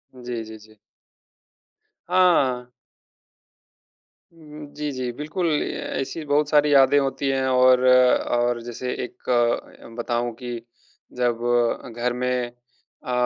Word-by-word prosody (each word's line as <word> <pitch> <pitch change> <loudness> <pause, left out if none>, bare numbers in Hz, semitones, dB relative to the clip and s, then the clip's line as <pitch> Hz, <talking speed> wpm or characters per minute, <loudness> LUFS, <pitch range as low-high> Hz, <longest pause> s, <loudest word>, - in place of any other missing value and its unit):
जी, 120 -2 -5
जी, 110 0 -10
जी। 110 0 -19 1.3
हाँ। 160 -9 +3 1.7
उहुँ, 150 -2 -12
जी, 150 0 -3
जी। 130 -2 -3
बिल्कुल 160 +4 -2 0.2
ए - - -4 0.3
ऐसी 135 +4 -4
बहुत 145 +1 +1
सारी 150 -1 +4
यादें 135 0 +6
होती 135 0 -2
हैं 135 -1 0
और, 130 0 +4
और 120 -1 +3
जैसे 120 +2 -5
एक 125 - -10 0.7
बताऊँ 120 0 -2
कि 125 - -7 0.7
जब 120 -2 +1 0.6
घर 120 +1 -1
में 125 0 -1
अ, 125 +1 -14
125 Hz, 115 wpm, -23 LUFS, 120-145 Hz, 1.7 s, यादें